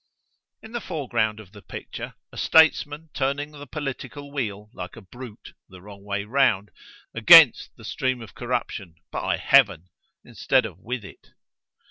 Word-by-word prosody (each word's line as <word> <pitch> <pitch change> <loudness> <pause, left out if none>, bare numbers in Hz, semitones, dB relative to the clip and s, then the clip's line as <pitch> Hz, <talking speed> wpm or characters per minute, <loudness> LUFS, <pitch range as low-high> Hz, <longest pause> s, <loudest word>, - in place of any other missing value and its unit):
In 220 - -11
the 240 0 -4
fore 155 -8 -5
ground 110 -2 0
of 100 -4 -13
this 105 -1 -14
picture, - - -8 0.2
a - - -14
statesman 160 -1 +3
turning 140 +2 -2
the 145 -1 -11
political 145 -1 -6
wheel, 105 -6 -4
like 90 0 -8
a 115 - -11
brute, 120 +3 -12 0.2
the 95 - -13
wrong 100 +1 -13
way 100 0 -3
round——against 110 -5 +4
the - - -14
stream 130 -1 -2
of 115 -3 -11
corruption—by 105 -9 -4
Heaven!——instead 90 +4 +1
of - - -9
with 120 -2 -5
it. - - -15
120 Hz, 140 wpm, -24 LUFS, 100-145 Hz, 0.2 s, round——against